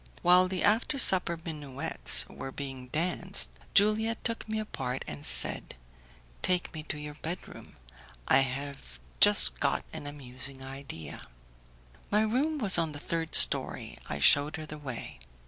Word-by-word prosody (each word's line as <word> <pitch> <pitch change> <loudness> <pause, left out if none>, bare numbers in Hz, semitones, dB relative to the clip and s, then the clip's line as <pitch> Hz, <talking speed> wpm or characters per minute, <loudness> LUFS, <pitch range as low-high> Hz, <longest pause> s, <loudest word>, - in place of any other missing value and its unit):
While 180 +1 +5
the 185 -1 -3
after 230 +7 +1
supper 180 -8 +4
minuets 145 -5 +3
were 135 - -9
being 135 -2 -8
danced 180 +6 -1 0.2
Juliette 220 +3 +1
took 230 -2 -3
me 220 - -2
apart, 135 -12 -5
and 75 -1 -6
said, - - +1 0.7
"Take 180 -1 -1
me 155 - -6
to 150 - -4
your 150 0 -8
bedroom; 170 +3 -8 0.5
I 135 - +5
have 135 - -5 0.2
just - - +5
got - - -1
an 145 - -6
amusing 135 -1 -7
idea." 135 - -8 0.9
My 210 +1 +2
room 265 +9 0
was 205 -9 +3
on 160 -2 -2
the 145 - -8
third 165 +1 -3
story; - - +4
I - - -4
shewed 145 +2 +4
her 155 - -7
the 150 0 -10
way. 130 - -8
150 Hz, 145 wpm, -28 LUFS, 135-190 Hz, 0.9 s, While